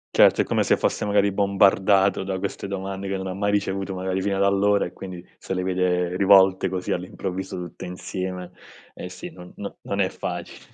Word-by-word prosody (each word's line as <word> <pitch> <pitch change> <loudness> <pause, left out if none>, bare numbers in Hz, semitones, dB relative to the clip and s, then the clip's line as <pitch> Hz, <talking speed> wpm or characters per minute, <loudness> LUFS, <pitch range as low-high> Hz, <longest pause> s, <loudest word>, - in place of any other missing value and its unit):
Certo, - - +6
è - - +2
come - - +1
se - - +3
fosse - - -1
magari 100 -1 +3
bombardato 100 0 +3
da 95 -1 -3
queste 100 +1 -4
domande 95 0 -4
che 95 - -2
non 95 0 -4
ha 95 - -4
mai 100 +1 0
ricevuto 100 -1 -1
magari 95 0 -2
fino 100 -1 0
ad 100 - +2
allora, 100 +1 +3
e 90 - -7
quindi 90 -1 -8
se - - -5
le 90 - -1
vede 90 -1 0
rivolte, 95 -1 +5
così 95 -1 -3
all'improvviso, 90 +1 -4
tutte 90 -1 -7
insieme, 90 0 -5 0.4
eh - - -6
sì, - - -8
non 90 0 -13
no 100 - -7
non 100 - -3
è 95 -1 +2
facile. 85 -2 -6
95 Hz, 200 wpm, -24 LUFS, 90-100 Hz, 0.4 s, Certo